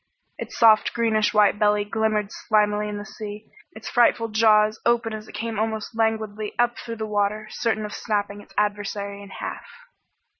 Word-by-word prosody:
Its -, -, -7 dB
soft 220 Hz, -2 st, +5 dB
greenish 220 Hz, -2 st, +2 dB
white 210 Hz, -1 st, +3 dB
belly 210 Hz, -1 st, +3 dB
glimmered 215 Hz, -1 st, 0 dB
slimily 210 Hz, -1 st, +1 dB
in 205 Hz, -, -4 dB
the 205 Hz, -, -7 dB
sea, 210 Hz, 0 st, -9 dB, 0.2 s
its -, -, -9 dB
frightful 235 Hz, -1 st, +3 dB
jaws 215 Hz, 0 st, +3 dB
open 235 Hz, -1 st, +1 dB
as 215 Hz, 0 st, -7 dB
it -, -, -13 dB
came 225 Hz, -2 st, -3 dB
almost 220 Hz, +1 st, -3 dB
languidly 220 Hz, -2 st, -1 dB
up 240 Hz, 0 st, +2 dB
through 230 Hz, -1 st, -6 dB
the 220 Hz, -1 st, -4 dB
water, 210 Hz, 0 st, -1 dB
certain 220 Hz, -2 st, -1 dB
of 210 Hz, -, -7 dB
snapping 205 Hz, -2 st, -2 dB
its -, -, -19 dB
adversary 205 Hz, -1 st, -2 dB
in 200 Hz, -, -11 dB
half. -, -, -7 dB
215 Hz, 175 wpm, -24 LUFS, 210-220 Hz, 0.2 s, soft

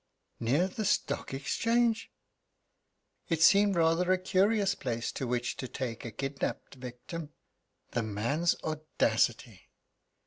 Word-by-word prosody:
"Near 140 Hz, +11 st, +2 dB
the 205 Hz, +3 st, -4 dB
Stock 205 Hz, -, 0 dB
Exchange?" 230 Hz, -, +1 dB, 1.2 s
It 165 Hz, -2 st, +2 dB
seemed 200 Hz, +2 st, +6 dB
rather 170 Hz, +2 st, +3 dB
a 185 Hz, -, +4 dB
curious 195 Hz, +2 st, +2 dB
place 120 Hz, -7 st, -3 dB
to 130 Hz, -, -4 dB
which 120 Hz, 0 st, -1 dB
to 130 Hz, -, -4 dB
take 120 Hz, -3 st, -5 dB
a 120 Hz, -, -5 dB
kidnapped 135 Hz, +5 st, -4 dB
victim. 135 Hz, +5 st, -8 dB, 0.6 s
The 120 Hz, -, 0 dB
man's 115 Hz, +11 st, 0 dB
audacity! 120 Hz, -8 st, 0 dB
150 Hz, 115 wpm, -30 LUFS, 120-185 Hz, 1.2 s, seemed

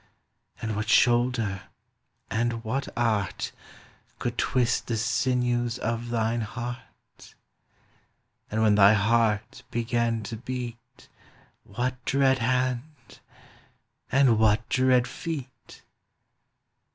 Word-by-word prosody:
And 110 Hz, -1 st, -2 dB
what 105 Hz, +1 st, -3 dB
shoulder, 120 Hz, -6 st, +3 dB, 0.7 s
and 115 Hz, 0 st, -1 dB
what 130 Hz, +5 st, -2 dB
art. 110 Hz, -6 st, 0 dB, 0.7 s
Could 120 Hz, -1 st, -3 dB
twist 125 Hz, -2 st, +1 dB
the 115 Hz, -, -1 dB
sinews 120 Hz, +1 st, 0 dB
of 115 Hz, 0 st, -3 dB
thine 115 Hz, 0 st, 0 dB
heart? 120 Hz, +4 st, -8 dB, 1.1 s
And 110 Hz, +1 st, 0 dB
when 110 Hz, -1 st, +5 dB
thy 100 Hz, 0 st, +7 dB
heart 110 Hz, +1 st, +1 dB
began 115 Hz, -1 st, -1 dB
to 110 Hz, +2 st, -6 dB
beat. 120 Hz, -1 st, -7 dB, 0.6 s
What 125 Hz, +4 st, -4 dB
dread 135 Hz, -1 st, +3 dB
hand? 125 Hz, 0 st, -2 dB, 0.9 s
and 130 Hz, -5 st, +4 dB
what 110 Hz, 0 st, +3 dB
dread 130 Hz, -1 st, +3 dB
feet? 135 Hz, -1 st, -7 dB
120 Hz, 95 wpm, -26 LUFS, 110-125 Hz, 1.1 s, thy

